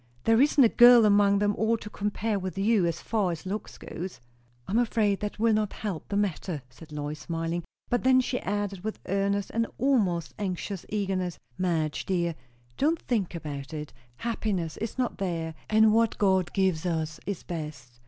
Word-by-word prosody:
"There 225 +2 +4
isn't 285 -1 +5
a - - +8
girl 240 0 +8
among 200 -1 +5
them 205 0 +1
all 225 +1 +2
to 210 - -10
compare 210 0 -2
with 190 0 -5
you, 200 -2 +3
as 170 0 -2
far 205 -5 0
as 165 +2 -6
looks 205 +3 -5
go." 175 - -6 0.6
"I - - -5
am 225 - +3
afraid 215 -4 +2
that 210 0 -4
will 225 +1 +3
not 215 -1 0
help 195 -7 -5
the 200 - 0
matter," 180 -6 -2
said 155 +5 -14
Lois, 150 0 -4
smiling; 165 +2 -3 0.2
but 245 - 0
then 260 0 +5
she 250 0 -1
added 200 -1 -3
with 220 0 -3
earnest 200 +1 0
and 230 0 +1
almost 205 - +1
anxious 190 -1 -4
eagerness, 190 -4 -1 0.2
"Madge, 165 -4 -1
dear, 175 -3 0 0.4
don't 315 +4 +2
think 205 -8 -1
about 145 -2 -6
it! 150 -1 -6 0.2
Happiness 200 - -2
is 225 +3 -4
not 250 -4 -1
there; 165 -4 -2 0.2
and 220 0 +5
what 230 0 +2
God 190 -3 +2
gives 190 -5 +1
us 160 -2 -2
is 200 -3 -3
best. 145 -8 -7
195 Hz, 185 wpm, -28 LUFS, 170-220 Hz, 0.6 s, a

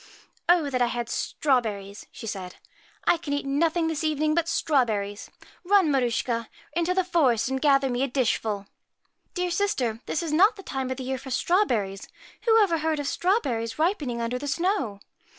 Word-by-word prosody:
* - - -33
Oh 345 -4 +5
that 255 -1 0
I 245 - +4
had 240 -1 -3
strawberries! 215 -8 -1
' - - -46
she - - -9
said. 190 -4 -5 0.3
' - - -31
I - - +4
can 305 -3 -4
eat 285 - -2
nothing 325 +4 +1
this 320 -1 -2
evening 310 0 +1
but 335 0 +1
strawberries. 220 -11 0 0.3
Run, 375 -4 +4
Mar 270 -2 +3
uschka, 230 -1 -1 0.3
into 345 +2 0
the 375 - +3
forest 265 - +2
and 265 0 -2
gather 275 -2 +4
me 245 -1 -1
a 275 - +2
dishful.' 225 -5 -1 0.4
* - - -46
Dear 360 -1 -1
sister, 275 - 0
this 325 - -1
is 315 -2 -3
not 400 +8 +5
the 390 - -11
time 265 -5 -3
of 260 - -3
the 265 - -5
year 260 0 -3
for 265 - -9
strawberries. 240 - 0 0.4
Who 450 -1 +6
ever 335 -5 +1
heard 315 -1 0
of 290 - -3
strawberries 275 - 0
ripening 305 - 0
under 240 +2 -2
the 290 - -5
snow?' 285 - -1
275 Hz, 200 wpm, -26 LUFS, 235-335 Hz, 0.4 s, Who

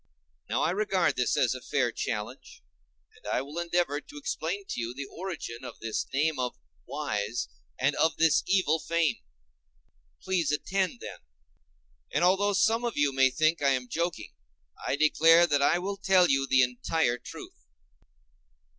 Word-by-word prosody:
Now - - 0
I - - +2
regard 195 -2 +1
this 125 - 0
as 125 -2 +2
a 130 - -7
fair 130 -4 0
challenge, 105 -2 -5 0.5
and - - -14
I 125 - 0
will 145 +5 -7
endeavor 170 -4 0
to 295 - -14
explain 395 +7 -3
to - - -3
you 115 +2 -4
the 140 +1 -5
origin 165 -9 -7
of - - -9
this 115 -1 -3
name 150 +1 0
of 125 -1 -2 0.3
"wise," 110 - -3 0.3
and - - +1
of 160 - +2
this 160 -1 +4
evil 180 -5 +2
fame. 165 -1 0 1.0
Please 180 -5 -1
to 150 - +3
attend 190 -5 -2
them. - - -8 0.9
And - - 0
although 195 +3 +3
some 225 +5 +2
of 240 -2 -3
you 145 -1 +2
may 135 0 +4
think 155 +5 +1
I 140 -1 +3
am 125 -1 -5
joking, 170 +5 -3 0.5
I - - 0
declare 165 +3 +5
that 145 -4 +1
I 155 +4 +4
will 195 +3 -4
tell 190 -3 +4
you 135 0 +1
the 130 -1 +5
entire 125 +1 0
truth. - - -11
155 Hz, 165 wpm, -28 LUFS, 130-180 Hz, 1.0 s, declare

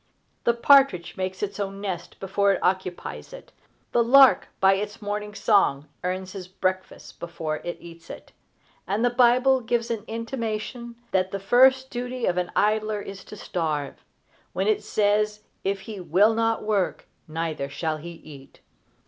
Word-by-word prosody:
The 235 - +3
partridge 235 -9 +4
makes 185 +1 -4
its 200 0 -4
own 195 -1 -4
nest 190 -4 -5
before 200 +1 +2
it - - -2
occupies 185 - -2
it. - - -12 0.4
The 235 - +3
lark, 265 +3 +6
by 195 0 +5
its 205 +2 -4
morning 210 0 -4
song, 195 -11 +2 0.2
earns 185 +1 -3
its 190 -3 -7
breakfast 185 0 -4
before 160 -2 -4
it 175 - -6
eats 165 -1 -13
it; - - -10 0.6
and 205 +6 0
the 245 - +2
Bible 250 +2 +4
gives 235 0 -1
an 220 -3 -3
intimation 230 +1 -4 0.2
that 185 -1 +1
the 195 - -3
first 260 +6 +4
duty 250 0 -3
of 180 - 0
an 180 -1 -1
idler 215 0 +1
is 195 -1 -8
to - - -10
starve, 155 -7 -3 0.5
when - - -1
it 430 -1 +1
says 210 0 +1 0.2
if 195 0 -1
he 205 0 -8
"will 200 +5 +3
not 225 0 0
work, 210 -4 -1 0.2
neither 160 -3 -3
shall 155 +2 -2
he 165 +3 -8
eat." 145 -4 -14
205 Hz, 160 wpm, -25 LUFS, 180-230 Hz, 0.6 s, lark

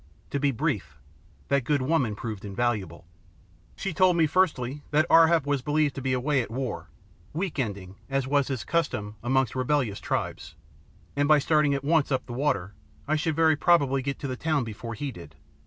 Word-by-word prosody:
To 140 - -1
be 145 0 +2
brief, 90 - -2 0.5
that 140 -1 +2
good 140 +1 +1
woman 130 -7 +1
proved 110 -2 -6
invaluable. 100 -5 -2 0.7
She 195 - -4
told 180 +1 +4
me, 165 - +5
firstly, 150 -5 0
that 155 +1 +3
Ar 165 0 +8
hap 165 -3 +2
was 145 -2 0
believed 150 +1 +1
to 135 - -6
be 130 0 -1
away 130 +2 +1
at 115 - -6
war, 125 +2 -4 0.5
"weekending" 105 - -3
as 135 -1 0
was 140 0 +1
his 130 -6 -3
custom, 105 -11 -2
amongst 130 0 +1
rebellious 130 -5 0
tribes, 80 +1 -3 0.6
and 145 0 +2
by 155 0 +6
starting 150 0 +2
at 140 - -4
once 155 -1 +2
up 130 - 0
the 120 - -7
water, 120 -8 -1 0.3
I 155 - +2
should 160 0 -1
very 160 0 +4
probably 140 -5 +3
get 140 +1 -3
to 140 - -3
the 130 - -3
town 155 0 0
before 115 +1 -6
he 140 +5 -4
did. 80 - -12
135 Hz, 190 wpm, -26 LUFS, 115-150 Hz, 0.7 s, Ar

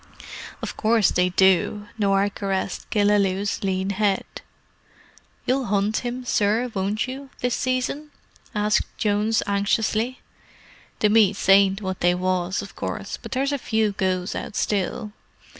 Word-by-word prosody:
"Of - - -4
course 220 -2 +3
they 180 0 +2
do." 190 +3 +2
Norah 200 -1 +2
caressed 195 -2 -3
Killaloe's 205 -2 +1
lean 190 0 0
head. 200 -1 +1 1.2
"You'll 260 +1 +1
hunt 205 +1 +1
him, 245 +1 -4
sir, 225 +2 +1
won't 200 +4 -1
you, 270 +2 -7
this 245 -1 0
season?" 255 +4 -1 0.5
asked 210 0 +2
Jones 210 +1 +1
anxiously. 220 +4 0 0.8
"The 210 - +4
meets 205 -3 +3
ain't 195 +1 +5
what 190 -1 -3
they 175 0 +3
was, 185 +1 -1
of 200 - -11
course, - - -4
but - - -7
there's 270 +2 0
a 285 - -1
few 220 -3 +1
goes 185 -1 -1
out - - -6
still. 210 +2 -1
205 Hz, 135 wpm, -23 LUFS, 195-225 Hz, 1.2 s, ain't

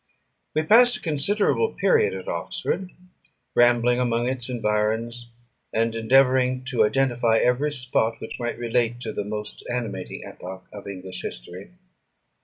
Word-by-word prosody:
We 155 - +2
passed 245 +8 +6
a - - -14
considerable 200 - +1
period 450 -2 +2
at - - -7
Oxford, 190 - -3 0.6
rambling 120 0 +4
among 120 -1 +1
its 130 -1 -3
environs, 115 +1 -1 0.4
and 115 +1 +1
endeavouring 130 +2 +3
to 125 - +3
identify 120 -1 +2
every 125 +6 +2
spot 125 -4 0
which 110 - -7
might 120 -1 -3
relate 120 0 0
to 110 -3 -4
the 105 - -2
most 105 +1 -5
animating 110 -7 -4
epoch 95 +1 -9
of 100 -1 -9
English 95 -2 -6
history. 90 +11 -7
120 Hz, 135 wpm, -24 LUFS, 110-130 Hz, 0.6 s, passed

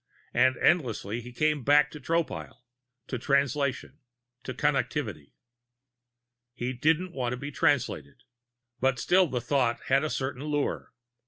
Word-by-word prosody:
And 130 +1 +3
endlessly 120 - +1
he 120 - -10
kept 120 - -18
coming 145 -4 -5
back 145 +2 +4
to 150 - -9
Tropile, 165 -2 -3 0.4
to 130 - -4
Translation, 140 0 0 0.4
to - - -5
Connectivity. 125 - -1 1.2
He 125 +1 -3
didn't 160 +8 +1
want 125 -2 -2
to - - -4
be 145 +3 -6
Translated. 80 - 0 0.6
But 130 0 +2
still 180 +8 +3
the 125 -4 -2
thought 125 -2 +1
had 135 +2 +4
a 155 - -1
certain 130 0 -3
lure. 145 -1 -2
135 Hz, 140 wpm, -28 LUFS, 125-150 Hz, 1.2 s, back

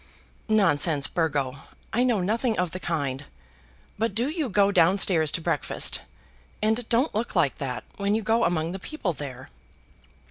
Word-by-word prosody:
"Nonsense, 160 -8 +4
Burgo; 145 -6 -1 0.4
I 235 - +2
know 240 -6 +2
nothing 225 +4 0
of 180 -2 0
the 185 - -5
kind. 145 -6 -3 0.7
But 225 -2 -1
do 240 +5 +1
you 310 -4 -2
go 200 0 +3
down 185 +1 +4
stairs 160 -6 +3
to - - +1
breakfast, - - 0 0.6
and 220 +2 0
don't 250 +6 +2
look 225 +3 -3
like 135 - +1
that 125 -3 -4
when 200 +1 +1
you 220 - -1
go 225 +2 +2
among 165 -1 0
the 190 - -5
people 200 - -3
there." 130 -3 -8
185 Hz, 165 wpm, -25 LUFS, 155-220 Hz, 0.7 s, Nonsense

